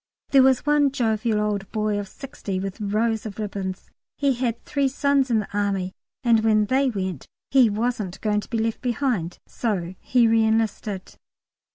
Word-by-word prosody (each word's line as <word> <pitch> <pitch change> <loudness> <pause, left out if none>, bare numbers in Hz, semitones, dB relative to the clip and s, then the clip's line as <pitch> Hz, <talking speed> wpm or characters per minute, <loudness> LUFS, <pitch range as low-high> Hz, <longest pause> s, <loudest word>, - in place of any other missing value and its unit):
There 275 - +6
was 260 +1 +4
one 295 -1 +4
jovial 225 -4 0
old 205 -2 -2
boy 215 -1 0
of 200 - -5
60 250 -6 -6
with 195 +3 -5
rows 220 +2 0
of 205 - -9
ribbons. 195 -3 -5 0.3
He 280 -2 +2
had 240 -2 -2
three 280 -2 +1
sons 275 0 +1
in 230 - +3
the 210 -1 -3
Army, 195 -2 0 0.3
and 235 -2 +5
when 215 -1 +3
they 265 +4 +2
went 190 - -4 0.2
"he 260 -4 +6
wasn't 215 -3 -2
going 210 -1 +1
to - - -13
be 230 - -1
left 225 0 -1
behind," 240 -9 -1
so 185 -7 -2
he 245 -2 +3
re 225 0 +4
enlisted. 220 -3 -1
220 Hz, 175 wpm, -24 LUFS, 205-250 Hz, 0.3 s, There